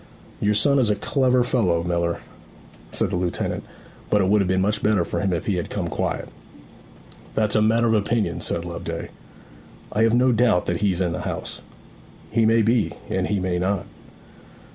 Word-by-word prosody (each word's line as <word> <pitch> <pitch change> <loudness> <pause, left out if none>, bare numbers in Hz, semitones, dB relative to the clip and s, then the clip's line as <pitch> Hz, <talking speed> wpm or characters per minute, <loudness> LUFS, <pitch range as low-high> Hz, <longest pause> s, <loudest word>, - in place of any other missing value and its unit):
'Your 105 +1 +2
son 140 +7 +4
is 120 -5 +3
a 105 - +2
clever 130 -1 +2
fellow, 95 -10 +1
miller,' 85 -1 -1 0.7
said - - -1
the - - -1
lieutenant; 90 -1 -2 0.5
'but 105 - +3
it 95 -1 +2
would 105 0 +4
have 95 - 0
been 95 0 +1
much 105 +2 0
better 105 -5 +2
for - - -3
him 100 -2 0
if 85 -3 -2
he 100 -4 0
had 85 - -3
come - - -3
quiet.' - - -2 1.1
'That's 105 -2 +1
a 110 - +3
matter 115 +2 +3
of 115 - +3
opinion,' 110 +1 0
said 85 - -1
Loveday. 85 -1 -5 0.8
'I 110 - 0
have 115 +1 +4
no 125 +1 +4
doubt 115 -6 +3
that 85 +2 -2
he's 95 -3 +1
in 90 -2 +1
the - - -3
house.' - - -5 0.7
'He 110 0 +3
may 115 0 +4
be; 115 0 +2 0.2
and - - 0
he 105 -1 0
may 90 -1 -1
not.' 95 +1 -1
105 Hz, 190 wpm, -23 LUFS, 90-115 Hz, 1.1 s, son